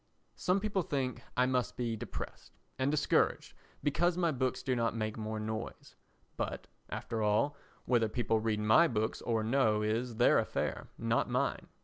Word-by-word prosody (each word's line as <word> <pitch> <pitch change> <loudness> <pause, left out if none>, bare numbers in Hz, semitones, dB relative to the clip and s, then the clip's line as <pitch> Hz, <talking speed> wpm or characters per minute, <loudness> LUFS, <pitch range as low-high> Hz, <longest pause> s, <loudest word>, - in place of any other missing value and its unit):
Some 185 +2 +1
people 200 -2 0
think 135 -6 -2 0.2
I 125 - +5
must 130 -1 0
be 120 -2 -1
depressed - - -7 0.3
and 130 +1 +2
discouraged 150 0 +1 0.3
because 175 +4 +2
my 170 -2 +2
books 130 -2 -1
do 130 - +1
not 115 -1 0
make 110 -1 -2
more 110 0 -4
noise; 110 +1 -5 0.4
but, - - -3 0.2
after 115 -1 -3
all, 110 +8 +2 0.3
whether 115 -3 +2
people 110 -1 +1
read 110 -1 0
my 110 +11 +6
books 110 -4 -1
or 115 -2 0
no 110 -3 +2
is 115 +3 -1
their 120 +2 +5
affair, - - -2
not - - +1
mine. - - 0
120 Hz, 160 wpm, -32 LUFS, 110-135 Hz, 0.4 s, my